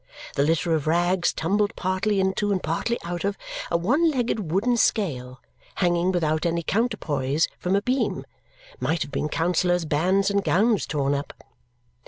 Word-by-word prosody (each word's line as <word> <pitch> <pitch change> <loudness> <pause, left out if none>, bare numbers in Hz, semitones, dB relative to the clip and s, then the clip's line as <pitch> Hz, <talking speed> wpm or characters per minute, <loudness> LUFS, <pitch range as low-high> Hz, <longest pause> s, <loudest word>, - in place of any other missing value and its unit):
The - - 0
litter 165 +3 +1
of 155 -2 -1
rags 175 +2 +2
tumbled 205 +5 0
partly 195 +2 0
into 190 +2 0
and 190 -2 -1
partly 235 +9 -1
out 175 0 -4
of 200 0 -1 0.3
a 170 - +2
one 275 - +2
legged 235 - -1
wooden 225 +7 +2
scale, 130 - 0 0.4
hanging 175 0 +2
without 155 -3 0
any 170 -1 0
counterpoise 160 - 0
from 180 +2 0
a 200 - +1
beam, 255 +3 -1 0.5
might 165 -1 0
have - - -11
been 150 - -2
counsellors' 175 +2 +1
bands 185 +6 +2
and 200 0 +1
gowns 215 +3 +2
torn 140 -2 0
up. 140 0 -4
180 Hz, 160 wpm, -24 LUFS, 160-200 Hz, 0.5 s, rags